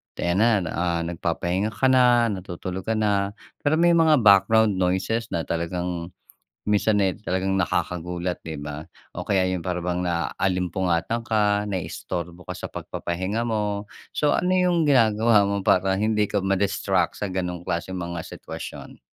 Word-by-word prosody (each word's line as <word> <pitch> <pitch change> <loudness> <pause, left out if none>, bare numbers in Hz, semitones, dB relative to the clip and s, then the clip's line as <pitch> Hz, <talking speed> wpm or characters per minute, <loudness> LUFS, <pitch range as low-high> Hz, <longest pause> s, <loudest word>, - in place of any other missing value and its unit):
'di - - -5
ayan 95 - +1 0.2
na, 80 - -4
ah, 85 -1 -1
nagpapahinga 85 +4 -2
ka 130 -1 +3
na, 120 -3 +4
natutulog 95 0 -6
ka 110 - +1
na, 100 -2 0 0.2
pero 145 +2 +1
may 170 +2 +4
mga 160 -6 +4
background 100 0 +5
noises 95 +6 0
na 85 -1 -2
talagang 85 0 -3 0.6
minsan, 105 +1 +2
eh, 95 - +2
talagang 95 -1 -1
nakakagulat, 90 -1 -2
'di 80 -1 -6
ba? 75 +1 -7 0.3
O 90 - -6
kaya 95 -3 +2
yun 90 - -1
para 90 +1 -2
bang 90 0 -1
naalimpungatan 90 - -1
ka, 105 -1 +2
naistorbo 90 -1 -5
ka 90 - -5
sa - - -6
pagpapahinga 95 +6 -3
mo. 105 -3 -1 0.3
So, 150 -1 +2
ano 185 +1 +1
'yung 175 -3 +2
ginagawa 110 -4 +4
mo 100 0 -1
para 95 0 +3
hindi 105 0 +2
ka 100 - -1
ma-distract 95 -2 0
sa 105 - -2
ganong 90 -2 -3
klaseng 90 +2 -3
mga 85 -1 -4
sitwasyon? - - -9
95 Hz, 155 wpm, -24 LUFS, 90-110 Hz, 0.6 s, background